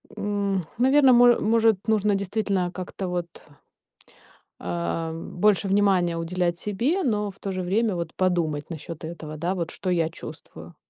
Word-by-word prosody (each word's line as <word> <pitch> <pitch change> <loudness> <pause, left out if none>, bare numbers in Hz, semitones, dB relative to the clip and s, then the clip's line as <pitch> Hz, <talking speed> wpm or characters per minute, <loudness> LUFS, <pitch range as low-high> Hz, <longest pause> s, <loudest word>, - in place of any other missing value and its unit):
М, 200 -2 -1 0.2
наверно, 265 +2 +5
моэ 245 0 +6
может, 225 0 +3
нужно 210 -2 +2
действительно 195 -2 -1
как-то 185 0 -5
вот 175 -1 -2 1.3
а, 90 - -3
больше 190 +4 +1
внимания 190 -4 +2
уделять 170 +1 -1
себе, 240 - 0
но 210 -5 0
в 195 - -23
то 195 - -4
же 185 -1 -3
время, 205 +3 +1
вот, 170 -2 -4
подумать 170 -5 0
насчёт 165 0 -8
этого, 160 -2 -7
да, 175 +4 -1
вот 170 -3 -3
что 185 - -4
я 165 -3 +1
чувствую. 85 - -11
185 Hz, 150 wpm, -25 LUFS, 165-210 Hz, 1.3 s, моэ